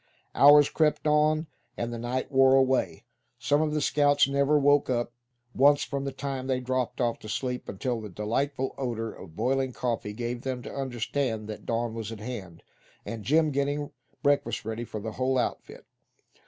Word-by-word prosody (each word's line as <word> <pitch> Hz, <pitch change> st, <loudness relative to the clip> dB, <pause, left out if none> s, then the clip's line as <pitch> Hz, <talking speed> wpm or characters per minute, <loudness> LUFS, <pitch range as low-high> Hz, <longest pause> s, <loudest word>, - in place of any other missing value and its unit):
Hours 145 Hz, +1 st, +7 dB
crept 155 Hz, -1 st, +1 dB
on, 155 Hz, +1 st, +3 dB, 0.3 s
and 120 Hz, 0 st, -3 dB
the 115 Hz, -, -5 dB
night 125 Hz, +4 st, -3 dB
wore 135 Hz, 0 st, +5 dB
away. 130 Hz, -1 st, +1 dB, 0.3 s
Some 135 Hz, +5 st, +1 dB
of 155 Hz, -1 st, 0 dB
the 150 Hz, 0 st, 0 dB
scouts 145 Hz, 0 st, +3 dB
never 140 Hz, +2 st, +2 dB
woke 145 Hz, -1 st, +3 dB
up 120 Hz, -1 st, -1 dB, 0.4 s
once 145 Hz, +2 st, +5 dB
from 140 Hz, -1 st, -4 dB
the 140 Hz, -, -2 dB
time 135 Hz, -1 st, -4 dB
they 130 Hz, -1 st, 0 dB
dropped 130 Hz, -1 st, -2 dB
off 120 Hz, -2 st, 0 dB
to 110 Hz, -, -10 dB
sleep 125 Hz, +3 st, -3 dB
until 115 Hz, +4 st, -3 dB
the 105 Hz, -, -7 dB
delightful 130 Hz, +8 st, -2 dB
odor 115 Hz, -4 st, -3 dB
of 80 Hz, -, -12 dB
boiling 130 Hz, +4 st, 0 dB
coffee 115 Hz, -4 st, -3 dB
gave 120 Hz, +2 st, -4 dB
them 130 Hz, -2 st, -4 dB
to -, -, -8 dB
understand 125 Hz, -3 st, -2 dB
that 110 Hz, -, -8 dB
dawn 115 Hz, 0 st, -1 dB
was 115 Hz, -1 st, -5 dB
at 110 Hz, -, -7 dB
hand, 105 Hz, -7 st, -7 dB, 0.4 s
and 115 Hz, -2 st, -6 dB
Jim 155 Hz, +4 st, +3 dB
getting 145 Hz, +1 st, -1 dB, 0.3 s
breakfast 140 Hz, -7 st, +1 dB
ready 110 Hz, +2 st, -4 dB
for 110 Hz, -, -6 dB
the 110 Hz, +2 st, -5 dB
whole 130 Hz, +3 st, 0 dB
outfit. 125 Hz, -, -3 dB
130 Hz, 180 wpm, -27 LUFS, 115-140 Hz, 0.4 s, Hours